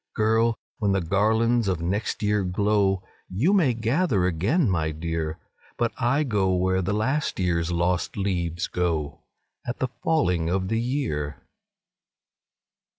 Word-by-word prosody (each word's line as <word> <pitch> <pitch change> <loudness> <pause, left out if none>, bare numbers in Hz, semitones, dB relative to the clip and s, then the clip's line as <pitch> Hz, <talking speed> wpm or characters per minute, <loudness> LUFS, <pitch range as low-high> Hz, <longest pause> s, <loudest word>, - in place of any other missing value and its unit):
Girl! 110 +1 +2 0.2
when 100 -3 +1
the 95 - +2
garlands 110 +6 +2
of 90 -3 0
next 100 +6 -2
year 105 -1 +2
glow, 95 0 +1 0.3
YOU 130 - +2
may 155 - +3
gather 115 - +1
again, 100 - +1
my 80 -5 +1
dear 80 0 -3 0.4
But 120 -1 +1
I 130 +5 +1
go 100 -8 +1
where 95 +1 +1
the 95 +2 -1
last 130 +8 0
year's 85 -2 0
lost 85 +3 0
leaves 85 -4 -1
go 80 -5 -2 0.4
At 120 - -4
the 130 - -1
falling 90 - +1
of 95 +1 -1
the 115 0 +1
year." 115 - -2
100 Hz, 140 wpm, -25 LUFS, 90-115 Hz, 0.4 s, may